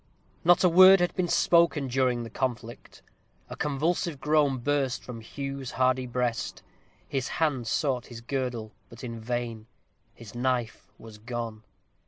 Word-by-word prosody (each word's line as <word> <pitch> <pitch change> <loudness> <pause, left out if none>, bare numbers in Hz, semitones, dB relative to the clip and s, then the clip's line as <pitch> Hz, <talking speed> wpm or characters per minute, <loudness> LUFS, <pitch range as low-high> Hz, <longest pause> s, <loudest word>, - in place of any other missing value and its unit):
Not 175 +2 +5
a - - +7
word 185 +3 +8
had 175 0 +1
been 180 -1 -1
spoken 170 -4 +3
during 125 -1 +1
the 115 - -9
conflict. 120 -2 -5 0.5
A - - -6
convulsive 150 +2 -1
groan 150 -3 +2
burst 135 0 -1
from 120 -2 -8
Hugh's 135 +2 -6
hardy 130 0 +1
breast. 120 -1 -2 0.4
His 135 -1 -2
hand 145 -8 -1
sought 130 -2 -1
his 120 -2 -9
girdle, 120 -3 -3 0.2
but 115 +1 -13
in 115 -2 -6
vain; 115 -1 -4 0.5
his 115 -4 -12
knife 120 -1 -2
was 110 -2 -13
gone. 115 -1 -5
130 Hz, 145 wpm, -27 LUFS, 120-145 Hz, 0.5 s, word